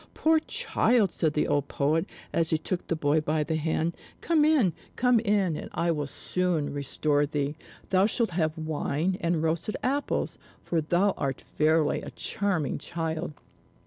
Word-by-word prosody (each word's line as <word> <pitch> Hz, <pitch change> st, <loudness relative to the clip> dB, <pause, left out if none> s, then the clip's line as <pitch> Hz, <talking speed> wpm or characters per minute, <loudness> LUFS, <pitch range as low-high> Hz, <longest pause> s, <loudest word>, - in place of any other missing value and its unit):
"Poor 320 Hz, 0 st, +4 dB
child!" 250 Hz, -, +1 dB
said 155 Hz, -3 st, 0 dB
the 150 Hz, -, +1 dB
old 145 Hz, -1 st, +1 dB
poet, 155 Hz, +3 st, +1 dB, 0.3 s
as 165 Hz, -1 st, +2 dB
he 160 Hz, -, +2 dB
took 175 Hz, +3 st, -4 dB
the 165 Hz, -, 0 dB
boy 155 Hz, 0 st, +2 dB
by 155 Hz, 0 st, 0 dB
the 160 Hz, +2 st, -2 dB
hand. 160 Hz, +1 st, -1 dB, 0.2 s
"Come 325 Hz, -3 st, +2 dB
in, 290 Hz, -, +4 dB, 0.2 s
come 250 Hz, -1 st, +4 dB
in, 200 Hz, -6 st, +1 dB
and -, -, -6 dB
I 170 Hz, 0 st, +1 dB
will 150 Hz, -3 st, -2 dB
soon 170 Hz, 0 st, -1 dB
restore 145 Hz, +1 st, +1 dB
thee! 145 Hz, 0 st, -2 dB, 0.3 s
Thou 190 Hz, +1 st, +4 dB
shalt 225 Hz, -2 st, 0 dB
have 160 Hz, -2 st, 0 dB
wine 155 Hz, +2 st, -1 dB
and 170 Hz, -2 st, +1 dB
roasted 165 Hz, +6 st, -1 dB
apples, 280 Hz, +3 st, -1 dB, 0.2 s
for 165 Hz, -2 st, -1 dB
thou 175 Hz, +6 st, +2 dB
art 135 Hz, -1 st, -2 dB
verily 155 Hz, 0 st, +1 dB
a -, -, -7 dB
charming 190 Hz, -8 st, -1 dB
child!" 165 Hz, -1 st, -3 dB
165 Hz, 165 wpm, -27 LUFS, 155-195 Hz, 0.3 s, Poor